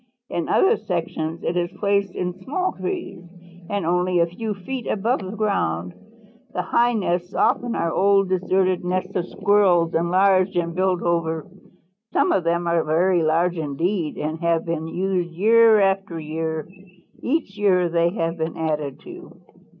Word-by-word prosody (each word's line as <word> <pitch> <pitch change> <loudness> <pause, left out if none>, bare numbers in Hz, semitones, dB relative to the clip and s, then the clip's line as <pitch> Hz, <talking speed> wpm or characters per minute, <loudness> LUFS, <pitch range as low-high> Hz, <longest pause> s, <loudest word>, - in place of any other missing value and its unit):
In 170 - -2
other 430 +4 +4
sections 165 -2 -4
it 175 - -1
is 175 -1 0
placed 200 -2 0
in 180 0 -2
small 295 - -3
trees 350 - -5 0.5
and 200 -4 -2
only 180 +1 +1
a 170 - +4
few 210 +5 -5
feet 240 +6 -6
above 225 +6 0
the 195 +2 -7
ground. 90 - -1 0.6
The - - -2
high 240 +1 +2
nests 180 -4 -2
often 240 -1 +1
are 165 0 0
old 195 0 +3
deserted 185 0 +1
nests 185 +2 -2
of 180 -1 -1
Squirrels 195 -4 +2
enlarged 185 +3 +3
and 170 -1 -1
built 185 0 0
over. 165 -2 -1 0.7
Some - - +2
of 190 - +2
them 170 +1 0
are 170 -1 +2
very 175 +3 +2
large 165 +2 +1
indeed 160 +3 -2
and 155 +2 -3
have 170 -1 +1
been 165 -1 -3
used 180 0 -2
year 225 +3 +5
after 195 -3 0
year. 160 0 -4 0.5
Each 275 -7 -1
year 190 -4 +3
they 170 0 +2
have 165 -3 -3
been 160 0 -3
added 150 -4 -2
to. - - -12
180 Hz, 160 wpm, -22 LUFS, 165-195 Hz, 0.7 s, year